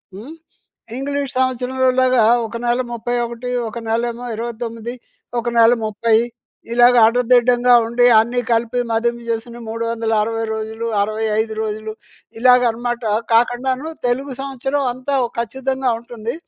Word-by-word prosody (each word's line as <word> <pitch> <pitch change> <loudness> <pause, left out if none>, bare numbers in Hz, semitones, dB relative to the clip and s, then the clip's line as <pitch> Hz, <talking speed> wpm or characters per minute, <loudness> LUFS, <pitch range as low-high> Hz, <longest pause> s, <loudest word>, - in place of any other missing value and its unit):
హ్మ్. 255 +11 -9 0.6
ఇంగ్లీష్ 280 0 -3
సంవత్సరంలోలాగా 255 -1 +2 0.2
ఒక 225 +1 -6
నెల 240 +1 +1
31, 240 +1 -3 0.2
ఒక 235 +2 -7
నెలేమో 235 +1 -2
29, 230 0 -5 0.5
ఒక 235 - -6
నెల 230 +1 +6
30 220 +1 +1 0.6
ఇలాగ 245 +1 +6
ఆడదిడ్డంగా 245 +1 +3
ఉండి 235 +2 +2
అన్నీ 235 +3 +2
కలిపి 230 +2 +1
మదింపు 235 +1 -1
చేసుకొని 230 +1 -4
360 225 -1 -1
రోజులు 220 +1 -4 0.2
65 215 0 -2 0.5
ఇలాగనమాట 240 -1 +3 0.3
కాకండాను 255 +4 +1 0.2
తెలుగు 265 +3 -1
సంవత్సరం 275 +1 -2
అంతా 255 +2 -3 0.2
ఖచ్చితంగా 265 +2 -2
ఉంటుంది. 235 -1 -6
235 Hz, 105 wpm, -19 LUFS, 225-250 Hz, 0.6 s, నెల